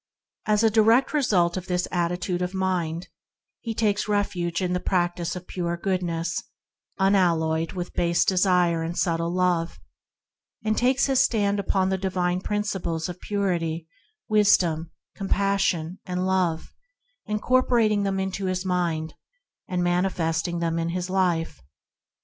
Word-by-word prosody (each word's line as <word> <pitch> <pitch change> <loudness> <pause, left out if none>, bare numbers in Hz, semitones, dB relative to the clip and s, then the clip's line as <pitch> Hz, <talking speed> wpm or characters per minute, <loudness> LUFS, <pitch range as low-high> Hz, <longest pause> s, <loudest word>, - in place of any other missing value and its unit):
As 210 0 +3
a 225 - +4
direct 225 +6 +4
result 190 - +2
of 185 - -6
this 180 -1 0
attitude 175 +1 -1
of 180 +1 -2
mind, 180 -2 -1 0.5
he 225 -2 -5
takes 210 -2 +1
refuge 180 -5 -1
in 180 -1 -1
the 180 - 0
practice 175 -1 -1
of 180 0 -7
pure 175 -2 -3
Goodness, 170 -3 -2 0.6
unalloyed 165 -5 +2
with 180 -2 -5
base 170 0 +2
desire 180 -3 +3
and 165 +1 -4
subtle 165 -1 0
self 175 - -3
love, 175 - 0 0.9
and 215 0 +2
takes 255 +3 +2
his 270 -2 +2
stand 205 -4 +2
upon 190 -1 +1
the 190 0 -1
divine 180 -1 -1
Principles 190 -5 -2
of 180 0 -7
Purity, 170 -5 -1 0.4
Wisdom, 180 -7 +3 0.3
Compassion, 195 -3 0
and 180 0 -2
Love, 180 -4 +1
60 - - -19
ENTERING - - -50
THE - - -47
KINGDOM - - -15
incorporating 235 -5 +3
them 195 -1 -1
into 190 0 -3
his 185 0 -2
mind, 170 -3 -1 0.5
and 180 -1 -1
manifesting 175 -2 0
them 165 -1 -1
in 165 0 -1
his 180 +1 -3
life. 175 - 0
180 Hz, 150 wpm, -25 LUFS, 170-200 Hz, 0.9 s, a